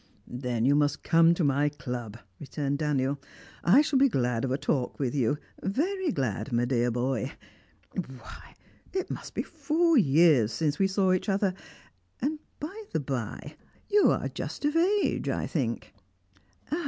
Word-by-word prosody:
"Then 125 -2 -2
you 140 - +5
must 145 0 +1
come 165 0 +5
to 170 - 0
my 145 +1 +2
club," 125 -6 -6 0.2
returned 145 0 -3
Daniel. 140 -2 0 0.4
"I 240 - +6
shall 280 -3 +1
be 275 0 +5
glad 125 - 0
of 135 - 0
a 130 - 0
talk 130 -3 -1
with 135 -3 -1
you, 140 0 +1 0.2
very 345 - 0
glad, 115 - -2
my 120 0 +2
dear 120 -1 +1
boy. 120 -1 -1 0.6
Why, 130 -10 -8 0.4
it 375 -1 -2
must - - -7
be - - -1
four 330 -1 +2
years 145 - +4
since 150 - -1
we 195 - +4
saw 190 -1 +2
each 185 +3 -1
other. 195 -1 +1 0.7
And, 300 +4 -1 0.2
by 390 +9 -6
the - - 0
bye, 130 -6 -5 0.4
you 415 0 +5
are - - 0
just - - -5
of 295 +2 +1
age, 385 +5 +2
I - - -1
think?" - - -3
145 Hz, 160 wpm, -28 LUFS, -, 0.7 s, I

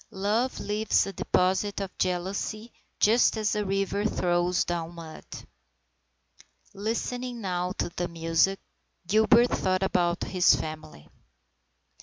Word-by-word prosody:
Love 215 +6 -1
leaves 210 +1 +1
a 195 - -6
deposit 190 +3 0
of 195 -2 -5
jealousy 195 +5 -2 0.3
just 225 +2 +4
as 215 -1 0
a 210 -1 0
river 195 +1 -1
throws 175 -3 +1
down 170 -1 -4
mud. 165 -2 -10 1.5
Listening 235 +4 -3
now 180 -3 -2
to - - -2
the 175 +1 -3
music, 165 +3 +1 0.5
Gilbert 220 +5 +4
thought 185 0 0
about 175 -2 +1
his 185 -2 +4
family. 155 - -7
190 Hz, 115 wpm, -27 LUFS, 175-215 Hz, 1.5 s, just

